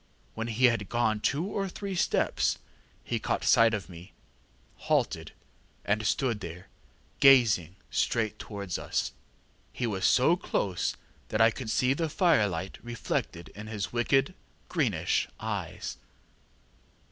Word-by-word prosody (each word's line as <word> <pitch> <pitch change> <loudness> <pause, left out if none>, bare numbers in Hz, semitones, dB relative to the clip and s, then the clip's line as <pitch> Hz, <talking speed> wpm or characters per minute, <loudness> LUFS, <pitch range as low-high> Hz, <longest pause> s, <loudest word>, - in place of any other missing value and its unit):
When 115 +1 -4
he 120 +3 +2
had 115 -5 +2
gone 110 -3 +1
two 140 +10 0
or 195 -1 -2
three 200 +1 -5
steps 175 - +1 0.5
he - - -2
caught - - -1
sight 115 0 +5
of 100 - -5
me, 90 +2 -12 0.8
halted, - - +1 0.5
and 110 +1 +1
stood 125 -6 0
there 90 -1 -8 0.5
gazing 110 - +5 0.2
straight 110 -3 0
towards 100 -4 -5
us; - - -2 0.6
he 125 - -3
was 100 -5 -2
so 130 +7 +5
close 100 - -1 0.3
that 110 - -1
I 115 0 +6
could 120 0 -6
see 130 +4 +2
the 160 +2 -1
firelight 105 - +1
reflected 115 -8 -3
in 105 +1 -10
his 105 -1 -4
wicked, 135 +8 +2 0.4
greenish 105 - 0
eyes. - - -4
115 Hz, 130 wpm, -29 LUFS, 100-135 Hz, 0.8 s, I